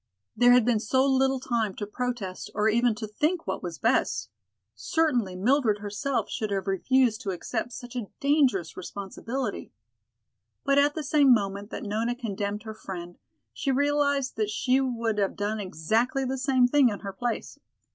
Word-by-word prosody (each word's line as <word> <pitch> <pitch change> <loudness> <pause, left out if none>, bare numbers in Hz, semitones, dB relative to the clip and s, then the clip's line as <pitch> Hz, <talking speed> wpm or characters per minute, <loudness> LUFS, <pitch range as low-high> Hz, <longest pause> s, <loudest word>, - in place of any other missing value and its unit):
There 245 0 +6
had 250 -2 +5
been 235 -3 +2
so 260 +5 +2
little 265 0 +2
time 230 -6 -1
to 205 - -4
protest 220 -4 -4
or 210 +1 +2
even 235 +1 +3
to 215 0 -5
think 310 - -1
what - - -3
was 175 -3 -5
best. 105 +2 +1 0.4
Certainly 240 - 0
Mildred 225 +2 +2
herself 210 +6 -2
should 215 - -3
have 195 -2 -2
refused 230 +4 +2
to 210 - -4
accept 190 +6 -3
such 245 0 -9
a 235 -5 -3
dangerous 270 - +2
responsibility. 205 +6 -5 0.9
But 275 0 +3
at 290 +1 +3
the 315 - -3
same 285 -1 +4
moment 200 -2 +1
that - - -6
Nona 225 +3 -1
condemned 205 -3 -4
her 220 -1 -6
friend, 175 -4 -8 0.3
she 280 - -3
realized 285 -1 +1
that 215 -1 0
she 255 +5 +2
would 230 -4 -1
have 195 -1 0
done 210 +2 -2
exactly 220 - 0
the 260 +1 -2
same 260 -2 +3
thing 275 -1 +4
in 205 - -5
her 195 -1 -6
place. 235 +4 -4
230 Hz, 170 wpm, -27 LUFS, 205-265 Hz, 0.9 s, There